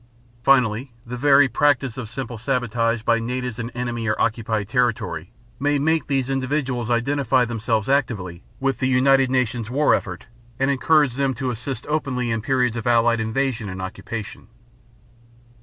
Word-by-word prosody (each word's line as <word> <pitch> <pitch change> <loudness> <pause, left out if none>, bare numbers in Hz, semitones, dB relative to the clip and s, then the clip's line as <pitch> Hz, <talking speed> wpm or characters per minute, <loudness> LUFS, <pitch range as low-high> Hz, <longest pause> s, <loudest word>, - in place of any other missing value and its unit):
Finally, 125 -1 +2
the 120 +1 -6
very 140 +2 +5
practice 135 -1 +1
of 125 -5 -6
simple 120 0 -5
sabotage 115 -2 -1
by 115 0 +2
natives 125 0 -4
in 115 0 -3
enemy 120 -2 -4
or 110 - 0
occupied 110 -2 0
territory 110 - -1 0.3
may 145 +1 +1
make 160 +3 +1
these 135 -3 0
individuals 130 -3 -1
identify 130 +1 +2
themselves 115 -2 -1
actively 105 -11 -1 0.2
with 135 0 -1
the 130 - +1
United 130 +1 +4
Nations 125 -3 0
war 145 +4 +3
effort, 90 -3 -3 0.3
and 135 +1 +1
encourage 140 -1 +2
them 135 -2 0
to 130 +1 -2
assist 125 +1 -5
openly 130 -6 -1
in 115 -1 -1
periods 125 -1 +1
of 115 +1 -4
Allied 115 -1 +3
invasion 115 -1 -1
and 95 0 -6
occupation. 100 +3 -7
125 Hz, 155 wpm, -22 LUFS, 115-135 Hz, 0.3 s, very